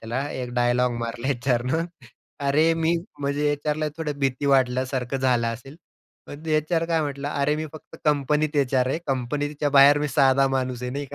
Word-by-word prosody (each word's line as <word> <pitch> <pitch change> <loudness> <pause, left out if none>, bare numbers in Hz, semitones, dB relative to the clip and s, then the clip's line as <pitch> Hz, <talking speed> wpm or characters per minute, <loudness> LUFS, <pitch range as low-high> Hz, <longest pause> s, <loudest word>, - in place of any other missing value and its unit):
त्याला, 125 +5 -3
एक 125 -1 -5
डायलॉग 120 0 +2
मारला 120 +2 -4
एचआरनं, 130 +4 0 0.6
"अरे, 155 +4 +3
मी" 165 +1 +1 0.3
म्हणजे 145 +1 0
एचआरला 150 +1 -2
थोडं 150 -3 -4
भीती 135 0 -1
वाटल्यासारखं 130 -1 +1
झालं 125 -3 +1
असेल. 125 +6 -7 0.5
पण 145 +2 -10
ते 155 -1 +1
एचआर 165 +2 0
काय 165 -1 +1
म्हटला, 140 -1 -4
"अरे, 145 +2 +2
मी 155 +1 -3
फक्त 155 - -12
कंपनीत 150 +1 +1
एचआर 130 -2 +2
आहे. 135 - -1
कंपनीच्या 145 +3 -2
बाहेर 140 +1 +7
मी 150 0 -1
साधा 135 -1 +4
माणूस 130 -2 -2
आहे," 125 - -3
नाही 140 +3 -4
का? 140 - -10
140 Hz, 180 wpm, -24 LUFS, 125-150 Hz, 0.6 s, बाहेर